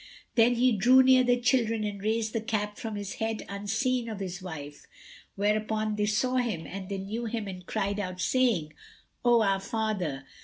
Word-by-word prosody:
Then 235 Hz, +1 st, +4 dB
he 250 Hz, +2 st, +4 dB
drew 245 Hz, +5 st, +6 dB
near 260 Hz, 0 st, +6 dB
the 245 Hz, 0 st, +2 dB
children 235 Hz, -3 st, +1 dB
and 205 Hz, -1 st, -4 dB
raised 220 Hz, +1 st, 0 dB
the 225 Hz, -, -1 dB
cap 210 Hz, -2 st, -2 dB
from 220 Hz, -2 st, -4 dB
his 205 Hz, -1 st, -5 dB
head 220 Hz, 0 st, -2 dB
unseen 220 Hz, +5 st, -1 dB
of 215 Hz, -2 st, -5 dB
his 185 Hz, -1 st, -5 dB
wife, 150 Hz, -5 st, -8 dB, 0.5 s
whereupon 215 Hz, +1 st, 0 dB
they 210 Hz, 0 st, 0 dB
saw 250 Hz, +5 st, +1 dB
him 215 Hz, -10 st, -1 dB
and 190 Hz, +3 st, -7 dB
they 200 Hz, -, -2 dB
knew 210 Hz, +5 st, -4 dB
him 225 Hz, -2 st, -3 dB
and 185 Hz, -1 st, -7 dB
cried 200 Hz, +1 st, -1 dB
out, 185 Hz, -2 st, -4 dB
saying, 195 Hz, -9 st, +1 dB, 0.5 s
"O 240 Hz, -2 st, +5 dB
our 195 Hz, -1 st, +2 dB
father!" 195 Hz, -10 st, -2 dB
215 Hz, 185 wpm, -28 LUFS, 195-235 Hz, 0.5 s, drew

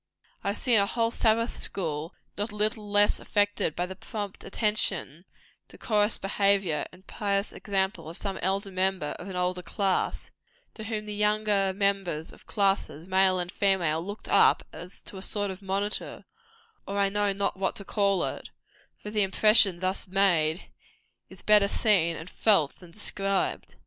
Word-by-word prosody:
I -, -, -4 dB
have 200 Hz, -, 0 dB
seen 240 Hz, -5 st, +4 dB
a 200 Hz, -, +2 dB
whole 230 Hz, +1 st, 0 dB
Sabbath 230 Hz, +1 st, +1 dB
school 160 Hz, -2 st, -3 dB, 0.2 s
not 205 Hz, +2 st, -3 dB
a -, -, -10 dB
little 210 Hz, -1 st, -1 dB
affected 205 Hz, -4 st, +1 dB
by 175 Hz, -, -1 dB
the 190 Hz, +1 st, -8 dB
prompt 205 Hz, 0 st, -7 dB
attention, 195 Hz, -6 st, 0 dB, 0.4 s
decorous 210 Hz, -1 st, 0 dB
behaviour 195 Hz, -5 st, +1 dB
and 180 Hz, +1 st, -18 dB
pious 200 Hz, -1 st, -2 dB
example 190 Hz, -5 st, -2 dB
of 165 Hz, -, -7 dB
some 195 Hz, -2 st, -4 dB
elder 195 Hz, +2 st, -1 dB
member 185 Hz, -4 st, 0 dB
of 185 Hz, -, -8 dB
an 190 Hz, -, -6 dB
older 180 Hz, 0 st, -1 dB
class, 190 Hz, +1 st, -1 dB, 0.4 s
to 220 Hz, -, -9 dB
whom 215 Hz, -1 st, -4 dB
the 210 Hz, -, -5 dB
younger 210 Hz, -1 st, +1 dB
members 195 Hz, -5 st, -1 dB
of -, -, -19 dB
classes, 195 Hz, -6 st, 0 dB
male 190 Hz, 0 st, +3 dB
and 180 Hz, 0 st, -2 dB
female, 175 Hz, -6 st, +1 dB
looked 205 Hz, +3 st, -8 dB
up, -, -, +4 dB
as 180 Hz, +2 st, -10 dB
to 195 Hz, -, -8 dB
a -, -, -8 dB
sort 205 Hz, 0 st, -2 dB
of 190 Hz, +1 st, -10 dB
monitor, 200 Hz, +2 st, -3 dB, 0.6 s
or 200 Hz, -, -3 dB
I 200 Hz, -1 st, +2 dB
know 205 Hz, 0 st, +1 dB
not 200 Hz, 0 st, -1 dB
what 190 Hz, 0 st, -1 dB
to 200 Hz, -, -3 dB
call 200 Hz, -2 st, +1 dB
it -, -, -4 dB, 0.5 s
for 210 Hz, -, -6 dB
the 210 Hz, -1 st, +1 dB
impression 195 Hz, -1 st, +4 dB
thus 185 Hz, +1 st, -1 dB
made, 180 Hz, -4 st, +1 dB, 0.6 s
is -, -, -12 dB
better 210 Hz, -1 st, +5 dB
seen 185 Hz, -6 st, +2 dB
and 160 Hz, -, -8 dB
felt 185 Hz, -7 st, +2 dB
than 180 Hz, -, -14 dB
described. 195 Hz, +1 st, -2 dB
195 Hz, 165 wpm, -27 LUFS, 185-205 Hz, 0.6 s, better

